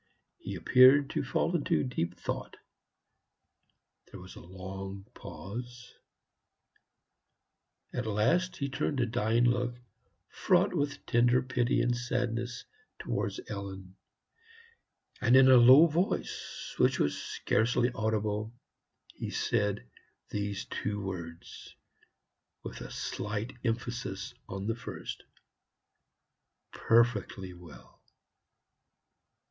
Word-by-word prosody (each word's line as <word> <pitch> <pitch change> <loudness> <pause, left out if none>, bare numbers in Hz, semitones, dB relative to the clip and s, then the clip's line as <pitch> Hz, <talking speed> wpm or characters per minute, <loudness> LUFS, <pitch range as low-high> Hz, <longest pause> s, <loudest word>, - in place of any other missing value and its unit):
He - - -6
appeared 135 +3 +6
to 155 - -1
fall 165 +5 0
into 155 - +1
deep 125 -11 -3
thought. - - -5 1.5
There - - -10
was 90 +1 -12
a - - -10
long 95 +2 -8
pause. 120 +4 -8 2.0
At 125 -2 -3
last 170 - +1
he 140 - -2
turned 135 +1 -2
a 120 - +3
dying 115 0 +1
look, 120 0 +1 0.5
fraught - - +2
with 145 0 -2
tender 120 +2 +3
pity 125 -1 +1
and 120 0 +1
sadness, 120 0 -2 0.3
towards - - -3
Ellen, 95 -2 -7 1.3
and 125 +1 +5
in 130 0 +8
a 130 - +9
low 130 +6 +9
voice, 170 +4 -2
which - - +4
was 75 - +1
scarcely 120 +2 +1
audible, 110 -1 -1 0.6
he - - -5
said 105 -1 0 0.5
these 100 -1 -3
two 105 0 -3
words, 85 -4 -7 0.9
with - - -7
a - - -7
slight 105 +2 -4
emphasis 115 -4 -3 0.2
on 95 +1 -5
the 115 - 0
first 115 - -7 1.5
"PERFECTLY 105 -5 +1
well." 85 -1 -15
115 Hz, 100 wpm, -30 LUFS, 100-125 Hz, 2.0 s, a